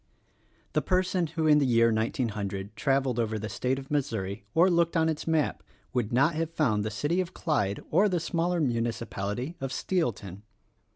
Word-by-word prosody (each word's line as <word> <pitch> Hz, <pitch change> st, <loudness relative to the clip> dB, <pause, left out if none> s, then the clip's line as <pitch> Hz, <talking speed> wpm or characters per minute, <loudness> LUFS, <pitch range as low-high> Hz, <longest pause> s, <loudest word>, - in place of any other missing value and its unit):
The -, -, +2 dB
person 185 Hz, -2 st, +1 dB
who 160 Hz, +1 st, -2 dB
in 150 Hz, -1 st, +6 dB
the -, -, +2 dB
year 115 Hz, -1 st, +4 dB
1900 105 Hz, -3 st, -2 dB
traveled 135 Hz, -3 st, +1 dB
over 110 Hz, -1 st, 0 dB
the 110 Hz, +1 st, -4 dB
state 130 Hz, +6 st, -1 dB
of 135 Hz, +1 st, -9 dB
Missouri, 105 Hz, -9 st, -2 dB
or 170 Hz, +3 st, +6 dB
looked 170 Hz, -1 st, +2 dB
on 160 Hz, 0 st, +3 dB
its 155 Hz, 0 st, -3 dB
map, 160 Hz, -2 st, +1 dB, 0.3 s
would 120 Hz, -4 st, -1 dB
not 135 Hz, +7 st, +3 dB
have 160 Hz, +1 st, -1 dB
found 120 Hz, -11 st, +1 dB
the 110 Hz, -, -2 dB
city 145 Hz, -, 0 dB
of 185 Hz, 0 st, -6 dB
Clyde 100 Hz, -, 0 dB
or 195 Hz, +6 st, +4 dB
the 180 Hz, -2 st, 0 dB
smaller 170 Hz, +2 st, 0 dB
municipality 115 Hz, -, -2 dB
of 135 Hz, -1 st, -3 dB
Steelton. 115 Hz, -, -2 dB
135 Hz, 175 wpm, -28 LUFS, 110-165 Hz, 0.3 s, in